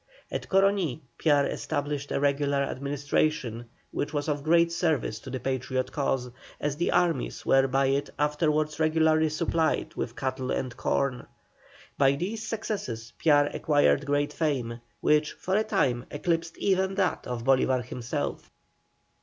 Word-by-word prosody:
At - - -4
Coroní 195 -7 +2 0.2
Piar 145 -3 +4
established 145 -1 -3
a - - 0
regular 140 0 +1
administration, 140 -3 -1 0.3
which 145 +1 -3
was 145 0 -1
of 145 -2 -1
great 170 +2 +4
service 160 -11 0
to 130 - -10
the 130 0 -4
Patriot 130 0 -2
cause, 135 -4 -1 0.3
as 145 -1 -1
the 170 - 0
armies 170 -6 0
were 135 0 +4
by 135 +1 +2
it 135 +1 0
afterwards 150 0 +1
regularly 155 0 +3
supplied 160 +1 0
with - - -4
cattle 130 -2 -3
and 130 -2 -2
corn. 135 -3 -1 0.7
By 135 -1 +5
these 190 +10 -3
successes 205 - -4
Piar 145 -2 +4
acquired 145 -2 +2
great 145 0 +1
fame, 125 -7 -1 0.2
which 150 0 +3
for 185 - -2
a 215 - +3
time 135 - 0
eclipsed 165 +2 -2
even 190 0 +1
that 190 -4 0
of 120 -2 -4
Bolívar 130 -1 +2
himself. 120 -1 -4
145 Hz, 145 wpm, -27 LUFS, 135-160 Hz, 0.7 s, By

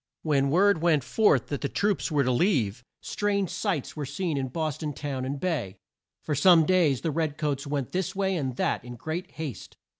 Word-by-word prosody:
When 145 -3 +2
the - - 0
word 185 +2 +3
went 160 -5 +3
forth 145 - +2
that 145 - -3
the 140 - -1
troops 205 -1 0
were 145 -2 +3
to 130 - +1
leave, 125 - +1 0.2
strange 200 -3 -1
sights 150 - -2
were 150 -3 -4
seen 175 -1 -2
in 135 -1 -1
Bos 155 +2 -3
ton 150 -2 -3
town 135 -2 -4
and 140 +2 -3
bay. 145 - -2 0.5
For 150 - -2
some 165 +2 +6
days 165 -7 +3
the 160 - -1
red 155 -1 -1
coats 145 -2 -2
went 140 -3 -2
this 185 0 -2
way 190 -1 0
and 135 -7 -2
that - - -1
in 120 0 -8
great 155 +9 -5
haste. 155 -6 -7
150 Hz, 210 wpm, -27 LUFS, 135-175 Hz, 0.5 s, some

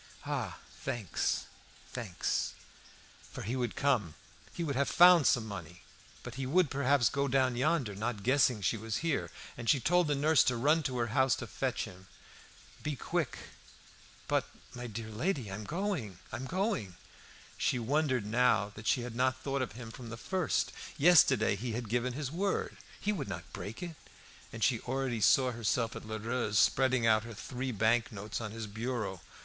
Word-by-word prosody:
"Ah! - - -3 0.2
thanks, 110 -7 -1 0.5
thanks!" 110 -8 -2 0.8
For - - -6
he 115 +6 -2
would 120 -3 -2
come; 120 - +1 0.4
he 170 - -4
would 145 -4 -2
have 140 +1 +1
found 175 -3 +7
some 120 -5 +3
money. 90 -4 -8 0.4
But 125 - -7
he 130 - -2
would, 170 +1 +3
perhaps, 140 -2 +3
go 140 0 0
down 130 -2 +2
yonder, 130 -3 +1
not 105 0 -3
guessing 125 -4 +3
she 110 - +1
was 110 0 -3
here, 155 -4 0 0.3
and 120 -1 -4
she 140 - +5
told 175 +6 +3
the 145 - +1
nurse 150 0 +4
to 125 - +2
run 150 +7 +3
to 125 - -4
her 120 -1 0
house 130 -2 +4
to - - -6
fetch - - -2
him. 95 +1 -13 0.7
"Be 150 -1 -2
quick!" - - -2 0.9
"But, - - +1 0.2
my 125 0 -6
dear 110 0 -6
lady, 125 - -1
I'm 105 +2 -5
going, 160 - -2
I'm 130 - -4
going!" 185 - -1 0.6
She - - +2
wondered 130 -1 +1
now 110 -2 +2
that 110 +1 -8
she 125 - +3
had 120 -1 -5
not 130 +1 +1
thought 140 -1 -1
of 125 - -3
him 115 -1 -8
from 120 0 -9
the 115 - -6
first. 185 +7 0 0.3
Yesterday 140 - +6
he 115 +3 -4
had 115 -1 -4
given 120 +2 0
his 140 0 -4
word; 195 +4 -1 0.2
he 210 - 0
would 200 - -4
not - - -7
break 110 - -6
it. 170 -2 -6 0.6
And 115 - -4
she 120 -4 +3
already 130 -2 -2
saw 130 +5 +5
herself 115 0 0
at - - -8
Lheureux's 110 0 -1
spreading 130 +3 +4
out 110 -1 +5
her 115 -1 -8
three 125 +4 -4
bank 110 +2 +2
notes 105 +2 -5
on 110 - -4
his 110 +1 -5
bureau. 110 -3 -3
125 Hz, 180 wpm, -32 LUFS, 110-140 Hz, 0.9 s, found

